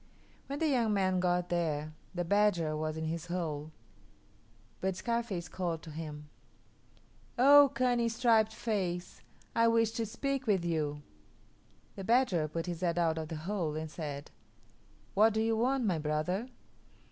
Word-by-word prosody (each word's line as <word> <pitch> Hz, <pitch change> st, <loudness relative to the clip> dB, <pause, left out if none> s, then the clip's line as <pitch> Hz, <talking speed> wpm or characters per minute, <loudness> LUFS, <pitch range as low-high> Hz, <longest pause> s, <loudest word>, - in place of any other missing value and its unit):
When 280 Hz, -, -4 dB
the 320 Hz, -, +1 dB
young 235 Hz, -7 st, +2 dB
man 185 Hz, -2 st, +2 dB
got 180 Hz, 0 st, +1 dB
there, 155 Hz, -3 st, -1 dB, 0.2 s
the 175 Hz, -1 st, -1 dB
badger 180 Hz, -5 st, +2 dB
was 155 Hz, 0 st, -3 dB
in 160 Hz, -, -3 dB
his 165 Hz, +2 st, -3 dB
hole. 160 Hz, -4 st, -3 dB, 1.1 s
But 190 Hz, 0 st, -1 dB
Scarface 230 Hz, -5 st, -2 dB
called 170 Hz, -3 st, -3 dB
to 160 Hz, -, -9 dB
him, 150 Hz, -1 st, -7 dB, 1.1 s
"Oh, 285 Hz, +3 st, +8 dB
cunning 245 Hz, -2 st, +2 dB
striped 225 Hz, -2 st, +3 dB
face! 185 Hz, -6 st, -3 dB, 0.3 s
I 230 Hz, 0 st, +4 dB
wish 230 Hz, -1 st, +3 dB
to 225 Hz, -1 st, -2 dB
speak 275 Hz, +4 st, -3 dB
with 190 Hz, -5 st, +2 dB
you." 150 Hz, -3 st, -1 dB, 0.9 s
The 195 Hz, -, -6 dB
badger 225 Hz, -8 st, +2 dB
put 165 Hz, +2 st, -4 dB
his 175 Hz, -1 st, -5 dB
head 175 Hz, -2 st, 0 dB
out 165 Hz, -2 st, +1 dB
of 160 Hz, -, -4 dB
the 160 Hz, -, -5 dB
hole 175 Hz, -6 st, -1 dB
and 155 Hz, 0 st, -4 dB
said, 145 Hz, -3 st, -6 dB, 0.8 s
"What 215 Hz, +2 st, +4 dB
do -, -, +2 dB
you 225 Hz, 0 st, +1 dB
want, 250 Hz, +2 st, +1 dB
my 180 Hz, -6 st, +1 dB
brother?" 155 Hz, +9 st, -1 dB
180 Hz, 155 wpm, -32 LUFS, 160-225 Hz, 1.1 s, Oh